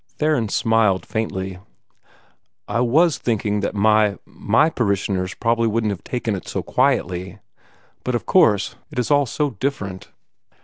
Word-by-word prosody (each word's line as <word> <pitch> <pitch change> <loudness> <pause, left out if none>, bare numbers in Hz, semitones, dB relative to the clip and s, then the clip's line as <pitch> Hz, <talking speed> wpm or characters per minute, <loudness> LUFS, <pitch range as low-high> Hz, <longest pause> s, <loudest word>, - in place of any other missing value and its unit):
Theron 150 -8 +1
smiled 110 -4 +2
faintly. 95 -4 -3 1.1
"I 120 - -1
WAS 145 +7 +3
thinking 105 -3 -1
that 100 - -3
my 105 0 +3
my 115 +9 +1
parishioners 100 -5 -1
wouldn't 115 -2 +1
have 95 -5 -6
taken 120 -3 -2
it 95 - -6
so - - -3
quietly. 90 +2 0 0.7
But 125 - -1
of 120 - -3
course 105 - +3
it - - -12
is 125 +3 -1
all 145 -2 +4
so 145 +4 -1
different!" 105 -5 -4
110 Hz, 135 wpm, -21 LUFS, 100-120 Hz, 1.1 s, all